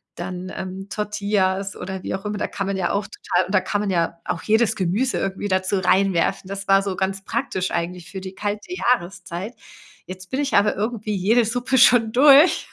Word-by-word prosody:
dann, 180 +1 -6
ähm, 190 +1 -6
Tortillas 200 -2 -1
oder 190 0 -6
wie - - -4
auch 190 +2 -5
immer. 210 0 -3
Da - - -2
kann 195 - -4
man 195 0 -2
ja 175 -2 0
auch 200 0 -1
total 185 - -1
und 195 - -2
da 190 - +4
kann 205 +2 -2
man 210 - -2
ja 170 -2 -1
auch 165 - -3
jedes 220 +1 +2
Gemüse 200 +8 0
irgendwie 195 +1 -3
dazu 190 0 0
reinwerfen. 185 -1 +1
Das 195 +1 -6
war 195 0 +5
so 195 -1 -3
ganz 195 0 -2
praktisch 215 -5 -2
eigentlich 175 0 -4
für 190 -1 -6
die 190 0 -8
kalte 210 - -4
Jahreszeit. 190 - -2 0.5
Jetzt 185 0 -10
bin 265 - -1
ich 285 -1 -2
aber 205 +1 +3
irgendwie 215 0 -2
jede 220 +5 +3
Suppe 245 +4 0
schon 240 -3 +5
durch. 280 +6 +6
195 Hz, 205 wpm, -22 LUFS, 185-215 Hz, 0.5 s, durch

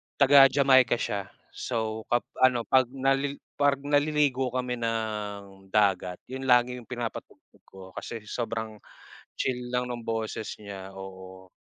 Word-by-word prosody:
Taga 140 0 +8
Jamaica 130 -3 +4
siya 100 -4 -3 0.2
so 110 -2 -3
kap 120 0 +1 0.2
ano 125 -2 +3
pag 130 +4 +4
nalil 135 +1 +1 0.2
pag 140 -1 +3
naliligo 145 -2 +2
kami 125 -1 -2
ng 105 -4 -4
dagat 95 -4 +2
yun 130 +1 -5
lagi 125 0 +4
yung 120 - -12
pinapatugtog 120 -2 -7
ko 95 - -14 0.2
kasi 115 -2 -6
sobrang 110 -1 -4 0.6
chill 125 -1 -3
lang 125 0 0
ng 120 -1 -5
boses 110 -1 -3
niya, 95 -2 -8
oo. 95 -1 -10
120 Hz, 135 wpm, -27 LUFS, 105-130 Hz, 0.6 s, Taga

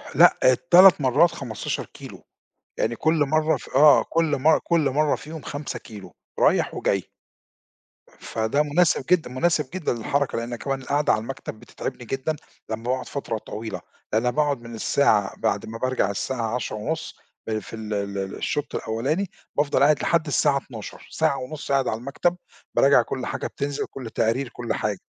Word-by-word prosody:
لأ - - +7
ال3 175 +7 +7
مرّات 140 +6 +4
15 115 -6 -4
كيلو - - -12 0.6
يعني 115 - 0
كلّ 160 +6 +1
مَرّة 155 +1 +2
ف - - -12
آه 145 +1 +7
كلّ 160 -3 +1
مَر 155 +4 +4
كلّ 165 -4 +2
مَرّة 150 +2 +2
فيهم 155 +1 -9
5 145 0 -5
كيلو، 100 -5 -12 0.2
رايح - - +3
وجاي 100 -2 0 1.1
فده 110 +6 0
مناسب 150 -1 +2
جدًا 175 -4 +2
مناسب 150 +2 0
جدًا 185 -8 -1
للحركة 135 +4 -1
لأن 120 +1 -3
كمان 135 +2 -3
القعدة 145 +3 +1
على - - +1
المكتب 115 -2 -7
بتتعبني 120 - -7
جدًا، 135 +6 -2 0.3
لمّا 110 0 -4
باقعد 125 +1 -2
فترة 135 -5 -3
طويلة، 110 +1 -6 0.3
أنا 115 +3 +2
باقعد 145 -1 0
من 115 0 -9
الساعة 110 -4 +2
بعد 100 - -1
ما 115 +1 -7
بارجع 130 -5 0
الساعة 115 +2 -2
10:30 125 +6 -4 0.3
ال 110 -1 -1
في 110 - -9
ال 110 -1 -5
ال 100 -1 -3
الشوط 145 -1 -3
الأوّلاني، 140 - -1 0.3
بافضل 145 -2 +2
قاعد 145 +1 +4
لحد 165 -2 +1
الساعة 145 -1 +2
12:00، 120 -6 -9
ساعة 155 -3 +1
ونُص 140 +3 -6
قاعد 135 -2 +2
على 110 - -1
المكتب 140 +8 -1 0.4
باراجع 135 -2 +6
كلّ 125 +1 -4
حاجة - - -3
بتنْزل 140 0 -3
كلّ 125 -4 -8
تقرير 115 +4 0
كلّ 120 -1 -4
حاجة. 105 -3 -2
135 Hz, 165 wpm, -24 LUFS, 115-150 Hz, 1.1 s, لأ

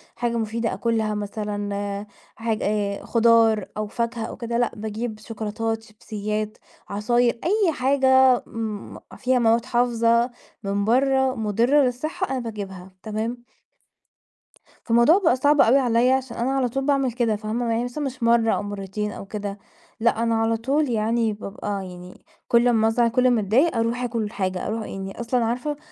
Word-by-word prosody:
حاجة 235 -1 -1
مفيدة 225 +1 -2
آكُلها 220 -2 0
مثلًا 205 -1 -4 0.3
حاجة 225 -1 -2 0.4
خُضار 225 -3 +4
أو 215 - -2
فاكهة 235 +1 -3
أو - - -7
كده، 235 -1 -3
لأ 240 0 +1
باجيب 220 +1 -5
شوكولاتات، 225 0 -4
شيبسيات، 215 -1 -5 0.3
عصاير، 235 +4 +1
أي 390 -1 +2
حاجة، 260 -2 +4
امم 220 -3 -6 0.2
فيها 255 0 +1
مواد 230 0 +3
حافظة، 235 -1 +2 0.3
من 200 +1 -1
برّه 265 +2 +2
مُضرّة 230 +7 +2
للصحة 310 +9 -2
أنا 265 - -1
باجيبها، 195 -5 -7
تمام؟ 225 +3 -4 1.4
فالموضوع 235 +9 +5
بقى 290 -7 +4
صعب 290 +2 +4
أوي 250 +5 +5
عليَّ 245 -1 +3
عشان 265 -2 -1
أنا 240 +3 0
على 265 -2 +1
طول 270 +3 -2
باعمل 275 -3 +2
كده 230 -2 0
فاهمة، 220 +3 -2
يعني 235 +2 0
مش 270 -4 -4
مرّة 230 -1 +4
أو - - -1
مرتين 205 +1 -4
أو - - -8
كده، 200 0 -5 0.4
لأ 230 0 +2
أنا 230 -1 +1
على 225 0 +1
طول 275 +5 0
يعني 225 0 +1
بابقى 205 -1 -5
يعني 180 0 -11 0.3
كل 235 +1 +4
أمّا 225 -2 +3
أزعل، 230 +1 +2
كل 255 +2 +3
أمّا 240 -3 +3
أتضايق، 245 - +2
أرُوح 230 +2 0
آكُل 230 -3 -2
حاجة 185 -3 -2
أرُوح 220 0 -3
يعني 195 +2 -7
أصلًا 240 0 0
عارفة 250 +6 -2
230 Hz, 155 wpm, -23 LUFS, 215-245 Hz, 1.4 s, فالموضوع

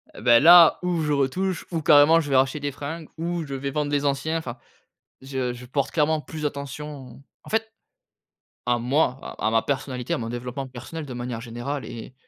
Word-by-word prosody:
eh - - -10
beh, 120 0 +6
là, 170 +3 +8
ou 180 -2 -1
je 150 -1 0
retouche 165 +6 -1
ou 165 -2 -1
carrément 150 +1 +7
je 150 -3 -3
vais - - +3
racheter 130 +3 +2
des 145 0 -3
fringues 150 +4 -7
ou 170 0 -2
je 140 - -7
vais 135 +1 -3
vendre 150 0 -2
les 145 -1 +1
anciens, 145 +4 0
enfin, 130 -6 -6 0.6
je 130 -2 -3
je 120 +1 -10
porte 135 +2 -1
clairement 155 0 +1
plus 155 0 -5
attention 140 -2 -7 0.2
en - - -12
fait, 220 0 -1 0.9
à 120 -1 +1
moi, 130 +2 +1
à - - -4
à - - +1
ma 115 0 +3
personnalité, 130 -3 -3
à - - 0
mon 115 -1 -4
développement 125 +3 -5
personnel 130 +6 -8
de 130 - -7
manière 120 -1 -4
générale 120 +3 -5
et 115 +3 -9
140 Hz, 205 wpm, -24 LUFS, 125-155 Hz, 0.9 s, là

